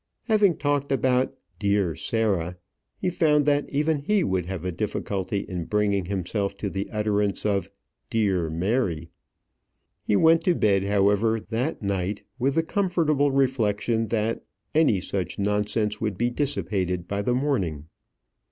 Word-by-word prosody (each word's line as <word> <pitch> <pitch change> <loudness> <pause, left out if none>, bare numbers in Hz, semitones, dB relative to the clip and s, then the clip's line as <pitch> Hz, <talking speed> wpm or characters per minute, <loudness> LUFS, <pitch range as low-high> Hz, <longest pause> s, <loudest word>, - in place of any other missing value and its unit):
Having 210 - +3
talked 145 -1 0
about 130 -1 +2 0.3
"dear 100 -5 +1
Sarah," 95 -2 -1 0.4
he 180 - -1
found 150 -4 +3
that 145 0 +1
even 150 +1 +1
he 200 +6 +1
would 95 - -1
have 95 -2 -5
a 90 - -1
difficulty 100 +1 -2
in 90 -3 -5
bringing 100 -2 +1
himself 100 +2 -2
to 100 0 -4
the 95 +1 -3
utterance 105 -2 0
of 100 -2 0 0.4
"dear 95 -7 +1
Mary." 85 -2 -1 0.9
He 105 - +1
went 165 +6 +5
to 180 - +3
bed, 100 -6 +2
however, 105 +3 +2
that 125 +3 -2
night 100 0 -2 0.2
with 135 +2 +1
the 165 - +3
comfortable 160 -6 +1
reflection 115 -4 +1
that 110 0 -1 0.3
any 150 -11 +4
such 95 0 -3
nonsense 105 +1 0
would 105 -4 -2
be 120 +3 +1
dissipated 95 - -1
by 100 0 -2
the 120 +4 +1
morning. 95 - -1
105 Hz, 145 wpm, -25 LUFS, 95-135 Hz, 0.9 s, went